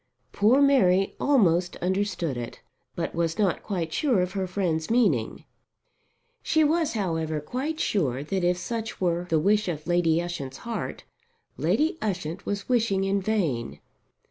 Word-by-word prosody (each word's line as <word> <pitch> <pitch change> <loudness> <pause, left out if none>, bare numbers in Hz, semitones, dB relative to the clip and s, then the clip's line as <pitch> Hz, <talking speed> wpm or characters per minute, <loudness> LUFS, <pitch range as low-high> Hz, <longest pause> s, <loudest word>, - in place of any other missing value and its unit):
Poor 240 +8 +4
Mary 195 -9 +4
almost 180 - +3
understood 185 -5 -1
it, 120 -1 -6 0.4
but - - -3
was 165 -1 -1
not 200 -4 +1
quite 170 -6 -3
sure 255 - +2
of 180 0 -1
her 190 -1 -2
friend's 175 -4 -1
meaning. 235 0 +1 1.0
She 315 - +2
was, 320 +1 +1
however, 160 -7 -1
quite 270 - -4
sure 140 - 0
that 190 +4 -2
if 175 0 +2
such 225 +4 -4
were 175 -1 0
the 160 - +3
wish 210 +5 +2
of 155 -3 -4
Lady 170 -2 +2
Ushant's 145 -7 -5
heart, 235 -1 -4 0.5
Lady 315 +2 +1
Ushant 180 -3 -3
was 200 -1 -3
wishing 225 -6 +1
in 195 +1 +1
vain. 175 - -1
185 Hz, 145 wpm, -26 LUFS, 165-220 Hz, 1.0 s, Poor